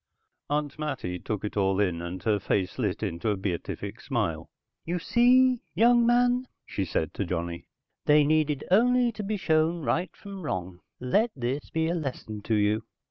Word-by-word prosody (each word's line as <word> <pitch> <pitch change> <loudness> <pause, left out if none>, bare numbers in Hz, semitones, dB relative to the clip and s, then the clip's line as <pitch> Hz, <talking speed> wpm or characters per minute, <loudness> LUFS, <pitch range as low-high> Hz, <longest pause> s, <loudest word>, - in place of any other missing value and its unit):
Aunt 145 0 -1
Mattie 90 -12 -3
took 105 +2 -4
it 105 - -5
all 95 -1 +2
in, 90 -5 +1
and 85 +2 -6
her 105 -3 +2
face 95 -2 -1
lit - - -1
into 85 +6 -2
a 105 - 0
beatific 95 -3 -4
smile. 80 0 -2 0.3
"You 175 +2 -2
see, 250 +6 +4
young 235 +4 +5
man," 245 +1 +3 0.2
she 100 - -3
said 80 -2 -2
to - - -2
Johnny. 85 -1 -4 0.4
"They 150 0 +6
needed 150 -1 +1
only 245 +4 +4
to 220 - -6
be 210 +1 -2
shown 160 -2 +1
right 165 +9 0
from 200 -1 -9
wrong. 90 - -4 0.2
Let 205 - +2
this 130 +2 -3
be 160 0 0
a 170 - 0
lesson 130 -9 -4
to 110 - +1
you." 105 +1 +2
145 Hz, 175 wpm, -27 LUFS, -, 0.4 s, They